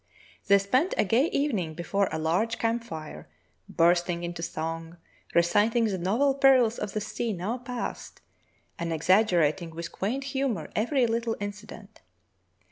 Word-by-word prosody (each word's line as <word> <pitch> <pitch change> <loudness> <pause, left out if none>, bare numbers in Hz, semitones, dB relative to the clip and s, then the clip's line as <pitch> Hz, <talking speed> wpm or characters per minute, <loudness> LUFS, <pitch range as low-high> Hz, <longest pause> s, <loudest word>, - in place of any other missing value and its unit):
They 200 - +7
spent 255 - +1
a - - +4
gay 240 - +3
evening 215 - -1
before 195 +4 0
a - - -2
large 180 +9 0
camp 230 +1 0
fire, 155 - -8 0.4
bursting 175 +1 +2
into 170 0 -5
song, 165 0 -5 0.4
reciting 210 +7 +3
the 195 -4 -1
novel 230 +11 +2
perils 265 -4 +4
of 205 -2 -4
the 215 - -1
sea 230 +1 -3
now 200 +7 -3
past, 245 -1 -6 0.6
and 170 0 -2
exaggerating 170 -1 +2
with 170 0 -6
quaint 245 +8 -2
humor 265 - -2
every 245 +4 +2
little 230 0 -1
incident. 205 +1 -8
205 Hz, 140 wpm, -27 LUFS, 170-235 Hz, 0.6 s, They